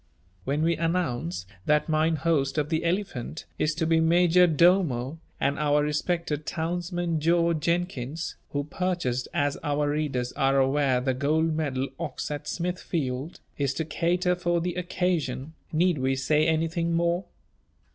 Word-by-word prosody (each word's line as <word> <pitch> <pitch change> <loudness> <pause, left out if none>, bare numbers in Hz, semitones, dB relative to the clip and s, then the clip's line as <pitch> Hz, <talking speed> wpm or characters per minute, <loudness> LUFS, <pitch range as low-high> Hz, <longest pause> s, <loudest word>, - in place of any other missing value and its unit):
When 145 +3 0
we 165 +1 +2
announce 125 - -1 0.2
that 150 0 +3
mine 160 +1 +2
host 155 -3 0
of 150 -1 0
the 160 0 0
Elephant 170 - -2
is 155 0 +1
to 165 0 0
be 165 0 +3
major 175 +2 +5
domo, 160 -4 +3 0.2
and 140 +1 0
our 150 0 +3
respected 150 0 -1
townsman 175 0 -2
George 170 +1 +2
Jenkins, 165 -2 -2
who 145 0 -2
purchased 150 -6 -2
as 145 0 0
our 145 -1 0
readers 140 -5 -1
are 135 0 +2
aware 135 -1 +2
the 130 0 0
gold 155 +4 +1
medal 140 -4 -1
ox 150 -3 -4
at 145 -1 -5
Smithfield, 165 -5 -3 0.2
is 140 -1 0
to 160 - -2
cater 175 +3 +1
for 175 -1 0
the 175 +1 -2
occasion, 170 -5 -2 0.2
need 170 -1 +2
we 130 +1 +1
say 150 +3 +2
anything 165 +1 0
more? 170 +2 +1
160 Hz, 145 wpm, -27 LUFS, 140-170 Hz, 0.2 s, major